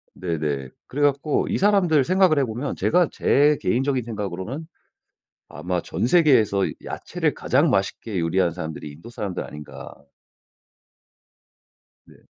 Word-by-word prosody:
네네. 75 Hz, -7 st, -3 dB, 0.2 s
그래 145 Hz, -, -4 dB
갖고 145 Hz, +1 st, +1 dB
이 -, -, 0 dB
사람들 185 Hz, -7 st, +3 dB
생각을 185 Hz, 0 st, +3 dB
해 140 Hz, -, +3 dB
보면 120 Hz, +5 st, -4 dB
제가 175 Hz, -1 st, +2 dB
제 145 Hz, +2 st, +3 dB
개인적인 130 Hz, +1 st, 0 dB
생각으로는 110 Hz, -, -5 dB, 0.8 s
'아마 85 Hz, +4 st, -3 dB
전 -, -, -2 dB
세계에서 125 Hz, -, +4 dB, 0.2 s
야채를 -, -, -2 dB
가장 -, -, +2 dB
맛있게 95 Hz, +1 st, -1 dB
요리하는 85 Hz, +1 st, +1 dB
사람들이 80 Hz, -3 st, -6 dB
인도 80 Hz, +11 st, -12 dB
사람들 105 Hz, -6 st, -4 dB
아닌가?' 75 Hz, -1 st, -10 dB, 2.1 s
네. -, -, -19 dB
115 Hz, 295 characters per minute, -23 LUFS, 90-145 Hz, 2.1 s, 세계에서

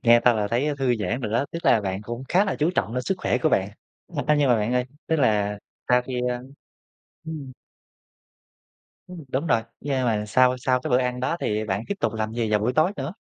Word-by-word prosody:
Nghe 120 Hz, 0 st, +6 dB
thôi 125 Hz, -, +6 dB
là 105 Hz, -2 st, -1 dB
thấy 125 Hz, +6 st, +1 dB
thư 130 Hz, -3 st, +2 dB
giãn 115 Hz, +4 st, -2 dB
rồi 110 Hz, -4 st, -3 dB
đó, 120 Hz, +4 st, +2 dB
tức 170 Hz, -, -6 dB
là 110 Hz, -, +5 dB
bạn 95 Hz, 0 st, -3 dB
cũng 120 Hz, +4 st, -6 dB
khá 190 Hz, +3 st, +4 dB
là 195 Hz, -, -2 dB
chú 155 Hz, +3 st, +2 dB
trọng 110 Hz, +3 st, -1 dB
đến 125 Hz, -, -1 dB
sức 190 Hz, -, 0 dB
khỏe -, -, 0 dB
của 160 Hz, -, +2 dB
bạn. 95 Hz, -8 st, +1 dB, 0.6 s
A, 150 Hz, -, +4 dB
nhưng 145 Hz, -2 st, +3 dB
mà, 120 Hz, -, +5 dB
bạn 105 Hz, +3 st, -1 dB
ơi, 125 Hz, 0 st, +2 dB, 0.2 s
tức 160 Hz, -, +1 dB
là 105 Hz, -6 st, +1 dB, 0.3 s
sau 125 Hz, 0 st, +4 dB
khi, 125 Hz, 0 st, -4 dB
a 120 Hz, -, -3 dB, 0.8 s
ừm. 150 Hz, -5 st, -6 dB, 1.5 s
Ừm, 175 Hz, -4 st, -10 dB
đúng 135 Hz, +5 st, -2 dB
rồi. 115 Hz, -6 st, +2 dB, 0.2 s
Nhưng 135 Hz, -3 st, -1 dB
mà 110 Hz, -3 st, +1 dB
sau 130 Hz, +3 st, +4 dB
sau 125 Hz, 0 st, +1 dB
cái -, -, -4 dB
bữa 125 Hz, -, +5 dB
ăn 125 Hz, -1 st, -1 dB
đó 130 Hz, +7 st, 0 dB
thì 105 Hz, +1 st, -1 dB
bạn 100 Hz, 0 st, -2 dB
tiếp 200 Hz, -, -2 dB
tục 110 Hz, -, +1 dB
làm 110 Hz, 0 st, -2 dB
gì 115 Hz, -2 st, -1 dB
vào 105 Hz, -1 st, +3 dB
buổi 115 Hz, +4 st, +1 dB
tối 155 Hz, +7 st, +3 dB
nữa? 140 Hz, +5 st, -4 dB
125 Hz, 240 wpm, -24 LUFS, 110-135 Hz, 1.5 s, Nghe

